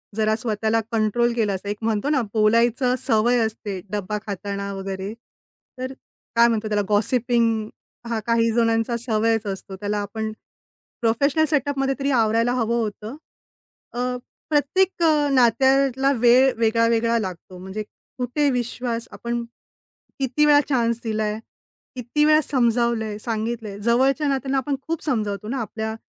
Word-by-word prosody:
जरा 215 0 +2
स्वतःला 220 -1 0
कंट्रोल 230 +2 +1
केलं 210 -4 +1
असतं, 200 +2 -6
एक 205 - -3
म्हणतो 225 +4 0
ना 285 -4 +2
बोलायचं 230 +3 +3
सवय 235 +1 +2
असते. 210 -3 -5
डब्बा 210 0 -2
खाताना 200 0 -4
वगैरे, 195 +1 -5 0.7
तर 260 +1 -4 0.4
काय 235 0 +6
म्हणतो 220 -2 -1
त्याला? 210 -1 +1
गॉसिपिंग 225 0 +1 0.4
हा 230 - -1
काही 230 0 +3
जणांचा 230 0 +1
सवयच 225 -1 0
असतो. 190 0 -6
त्याला 205 +2 -3
आपण 215 +2 -4 0.7
प्रोफेशनल 280 +7 +2
सेटअपमध्ये 275 -2 0
तरी 275 +1 0
आवरायला 230 0 +2
हवं 235 -1 0
होतं. 215 +3 -5 0.8
अ, 240 - -4 0.5
प्रत्येक 340 +5 +1 0.3
नात्याला 265 +2 +3
वेळ 250 +3 +5
वेगळा 230 0 +2
वेगळा 230 0 +2
लागतो. 185 -2 -7
म्हणजे 190 +4 -6 0.3
कुठे 265 +4 0
विश्वास, 245 -1 -3
आपण 235 0 -4 0.8
किती 270 +3 +2
वेळा 290 -1 +6
चान्स 235 -4 +1
दिलाय, 215 -1 -2 0.6
किती 255 +5 0
वेळा 310 0 +5
समजावलंय, 235 -5 +1
सांगितलंय, 220 -2 -3
जवळच्या 265 +7 +2
नात्यांना 270 0 0
आपण 275 +2 -1
खूप 330 -1 -3
समजावतो 210 - -2
ना 265 0 -2
आपल्या 220 0 -4
230 Hz, 135 wpm, -23 LUFS, 215-255 Hz, 0.8 s, काय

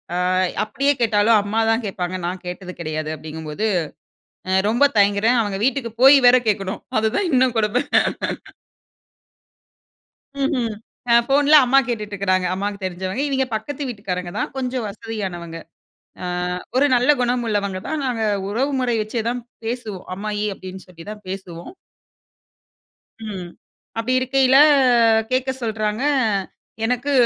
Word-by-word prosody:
அ - - 0 0.5
அப்டியே 280 +6 +1
கேட்டாலும் 215 0 +4
அம்மா 215 +3 -1
தான் 225 +1 0
கேட்பாங்க, 185 -2 -3
நான் 180 0 -5
கேட்டது 180 +1 -6
கிடையாது 155 -1 -3
அப்டிங்கும்போது, 155 +6 -5 0.8
அ - - 0 0.2
ரொம்ப 240 +5 +3
தயங்குறேன். 205 +4 +3
அவங்க 200 -2 -3
வீட்டுக்கு 250 -3 0
போயி 275 +1 +9
வேற 250 - +7
கேக்கணும் 195 -2 -1 0.2
அதுதான் 280 - 0
இன்னும் 255 -2 +3
கொடுமை. 215 +4 +1 2.6
ம்ஹ்ம். 255 -5 0 0.4
அ - - +6
ஃபோன்ல 290 +2 +5
அம்மா 270 +2 +4
கேட்டுட்ருக்குறாங்க, 200 -5 -1
அம்மாக்கு 200 +1 -3
தெரிஞ்சவங்க. 185 +6 -3
இவய்ங்க 265 -2 0
பக்கத்து 280 +6 -4
வீட்டுக்காரங்க 180 -6 -4
தான் - - -2
கொஞ்சம் 255 -2 -2
வசதியானவங்க. 190 -6 -6 0.7
ஆ - - -3 0.5
ஒரு 285 +2 +5
நல்ல 250 +4 +3
குணம் 245 0 0
உள்ளவங்க 200 -3 -1
தான். 315 - -2
நாங்க 230 -3 -1 0.2
உறவு 265 +7 -1
முறை 245 -2 0
வச்சே 220 +1 -3
தான் 245 +1 -2 0.2
பேசுவோம். 225 -5 -5
"அம்மாயி" 210 +1 -3
அப்டின்னு 185 0 -10
சொல்லி 165 -2 -13
தான் 210 0 -9
பேசுவோம். 185 - -8 1.5
ம். 190 -5 -6 0.5
அப்டி 235 +3 -1
இருக்கையில 265 0 +3 0.7
கேக்க 260 +1 0
சொல்றாங்க. 215 +1 -2 0.8
எனக்கு 250 +4 -1
215 Hz, 125 wpm, -21 LUFS, 190-250 Hz, 2.6 s, போயி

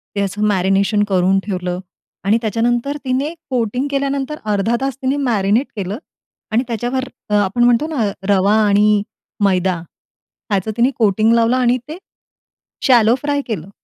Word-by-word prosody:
त्याचं 200 +1 -1
मॅरिनेशन 195 +2 +2
करून 190 +1 +3
ठेवलं. 180 -2 -3 0.4
आणि 210 +3 +3
त्याच्यानंतर 240 +5 0
तिने 270 +5 -1 0.2
कोटिंग 250 +2 -1
केल्यानंतर 275 +1 -2
अर्धा 205 +4 +1
तास 270 -1 -2
तिने 245 -5 +1
केलं 205 -5 -5 0.5
आणि 230 +3 +2
त्याच्यावर 245 +3 -2 0.3
आपण 205 +5 +1
म्हणतो 245 +5 +3
ना 225 -5 +1 0.3
रवा 200 +2 +3
आणि 210 +1 +4 0.4
मैदा 185 -1 +2
ह्याचं 195 +4 -6
तिने 245 +3 +3
कोटिंग 220 +1 +3
लावलं 230 +2 +3
आणि 250 0 +2
ते 315 - -6 0.9
शॅलो 240 -3 +5
फ्राय 290 -1 0
केलं. 195 -5 -4
225 Hz, 130 wpm, -18 LUFS, 200-255 Hz, 0.9 s, शॅलो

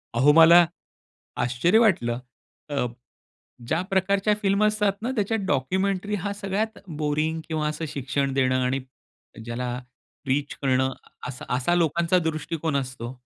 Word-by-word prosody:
अहो 135 +5 +5
मला 165 +2 +8 0.8
आश्चर्य 125 - +2
वाटलं. 125 - +2 0.5
अ, 140 -4 0 0.8
ज्या 160 +6 +1
प्रकारच्या 195 +2 +2
फिल्म 200 +1 +2
असतात 210 -1 +2
ना, 240 +3 -2
त्याच्यात 220 +1 0
डॉक्युमेंटरी 190 +8 0
हां 200 +1 -2
सगळ्यात 205 +2 -2 0.2
बोरिंग 155 +2 0
किंवा 155 -2 -1
असं 155 +2 -3
शिक्षण 140 0 -2
देणं 130 -1 +2
आणि 130 +2 0 0.7
ज्याला 120 +2 -3 0.6
रीच 140 +2 0
करणं 130 -1 +2 0.4
अस 125 0 -8
असा 125 +8 +1
लोकांचा 170 +1 +2
दृष्टिकोन 160 0 -3
असतो. 125 -3 -5
155 Hz, 125 wpm, -25 LUFS, 130-195 Hz, 0.8 s, मला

